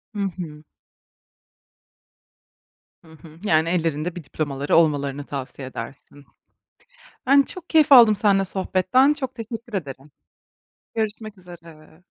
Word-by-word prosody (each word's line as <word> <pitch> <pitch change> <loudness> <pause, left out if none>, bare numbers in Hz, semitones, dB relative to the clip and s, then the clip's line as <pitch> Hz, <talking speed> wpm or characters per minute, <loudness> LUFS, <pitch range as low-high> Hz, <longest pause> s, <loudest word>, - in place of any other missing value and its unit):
Hı - - -4 0.2
hı. 155 -4 -8 2.4
Hı 160 - -17
hı. 160 0 -16
Yani 160 -5 +2
ellerinde 165 -1 -1
bir 175 - -8
diplomaları 140 -1 -2
olmalarını 145 -3 +1
tavsiye 135 -1 -7
edersin. 135 +3 -10 1.0
Ben 275 +2 +6
çok 355 +5 -9
keyif 310 -3 +4
aldım 235 -5 +8
senle 195 -2 +2
sohbetten, 190 +9 +2
çok 265 -4 -6
teşekkür 230 0 -8
ederim. 140 -6 -6 0.8
Görüşmek 215 -1 -4
üzere. 165 -2 -15
175 Hz, 110 wpm, -22 LUFS, 150-220 Hz, 2.4 s, aldım